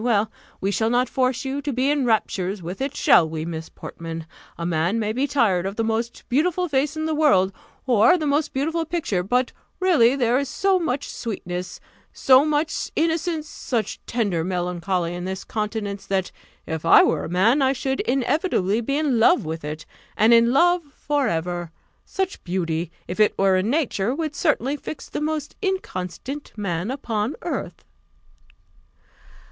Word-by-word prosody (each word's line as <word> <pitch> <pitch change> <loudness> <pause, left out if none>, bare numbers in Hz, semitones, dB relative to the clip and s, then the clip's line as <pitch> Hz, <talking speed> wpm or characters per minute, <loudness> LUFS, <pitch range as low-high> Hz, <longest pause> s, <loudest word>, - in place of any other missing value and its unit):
Well, 220 -3 +2 0.3
we 195 - 0
shall 220 +2 +1
not 245 +2 +2
force 255 -1 0
you 270 +2 -2
to 285 - -2
be 260 +3 +1
in 290 -3 +1
raptures 195 -4 0
with 180 +8 -6
it 275 +1 -2
shall 160 - +5
we, 160 0 -4
Miss 160 -1 -5
Portman? 165 -1 -7 0.3
A 170 - -4
man 170 +5 +1
may 215 -1 -1
be 265 +5 0
tired 200 -10 +2
of 195 - -5
the 225 - 0
most 225 +1 -2
beautiful 355 +7 +1
face 290 +1 0
in 315 - -2
the 315 - 0
world, 200 -12 +3 0.3
or 255 - +5
the 315 - -3
most 295 +1 +1
beautiful 320 +5 -1
picture; 320 - -1
but 245 +7 0 0.3
really 290 -10 +4
there 250 -1 +2
is 280 - -3
so 390 -1 +2
much 290 -5 -2
sweetness, 180 -5 -5 0.3
so 260 +1 +5
much 305 +1 -1
innocence, 325 -1 0
such 230 -7 -3
tender 205 -9 0
melancholy 180 0 -1
in 175 0 -5
this 190 +1 -4
countenance, 210 -2 -4
that, 190 -2 -1 0.3
if 160 -1 -4
I 165 - +7
were - - +1
a - - -6
man, 215 - +3
I 265 0 +4
should 265 0 -2
inevitably 245 - +1
be 275 +5 -1
in 290 -6 +1
love 225 - +4
with 160 0 -5
it, 150 +1 -6 0.3
and 220 +2 +5
in 235 0 +5
love 350 +6 +4 0.2
for 290 -3 0
ever! 175 0 -2 0.3
Such 385 -1 -3
beauty, 170 -2 -2 0.2
if 180 - -5
it 215 - +3
were 195 -1 +4
in 185 +4 +1
nature, 255 -5 0
would 310 -2 -3
certainly 290 -3 +1
fix 300 - -7
the - - -4
most 305 -1 -3
inconstant 280 - -4
man 185 -1 -2
upon 235 -2 -2
earth." 350 - -4
235 Hz, 175 wpm, -23 LUFS, 185-290 Hz, 0.3 s, I